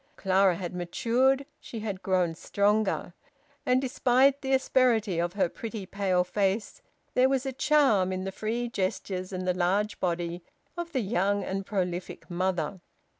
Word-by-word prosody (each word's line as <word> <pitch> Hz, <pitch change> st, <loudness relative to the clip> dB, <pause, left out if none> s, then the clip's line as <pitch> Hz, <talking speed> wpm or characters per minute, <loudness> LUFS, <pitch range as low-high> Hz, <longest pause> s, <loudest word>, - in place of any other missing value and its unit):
Clara 190 Hz, -1 st, +3 dB
had 175 Hz, 0 st, -5 dB
matured, 245 Hz, +10 st, +1 dB
she 225 Hz, -, -7 dB
had 200 Hz, -3 st, -4 dB
grown 180 Hz, -3 st, +1 dB
stronger; 200 Hz, +1 st, 0 dB, 0.5 s
and 250 Hz, 0 st, +4 dB
despite 265 Hz, +1 st, +3 dB
the 270 Hz, -, -3 dB
asperity 240 Hz, -8 st, +2 dB
of 175 Hz, +1 st, -1 dB
her 200 Hz, -3 st, +2 dB
pretty, 220 Hz, +2 st, -6 dB
pale 185 Hz, -2 st, +1 dB
face 200 Hz, +3 st, -1 dB, 0.3 s
there 255 Hz, +1 st, +4 dB
was 270 Hz, 0 st, 0 dB
a 265 Hz, -, -2 dB
charm 255 Hz, -10 st, +3 dB
in 185 Hz, 0 st, -3 dB
the 195 Hz, -, -3 dB
free 230 Hz, +4 st, -2 dB
gestures 190 Hz, -3 st, -3 dB
and 185 Hz, -1 st, -4 dB
the 180 Hz, -, +3 dB
large 195 Hz, +4 st, 0 dB
body 175 Hz, -1 st, -2 dB, 0.3 s
of 345 Hz, -1 st, -5 dB
the 260 Hz, -, 0 dB
young 200 Hz, -1 st, 0 dB
and 195 Hz, 0 st, -4 dB
prolific 180 Hz, -3 st, -3 dB
mother. 180 Hz, 0 st, -1 dB
200 Hz, 155 wpm, -28 LUFS, 185-240 Hz, 0.5 s, and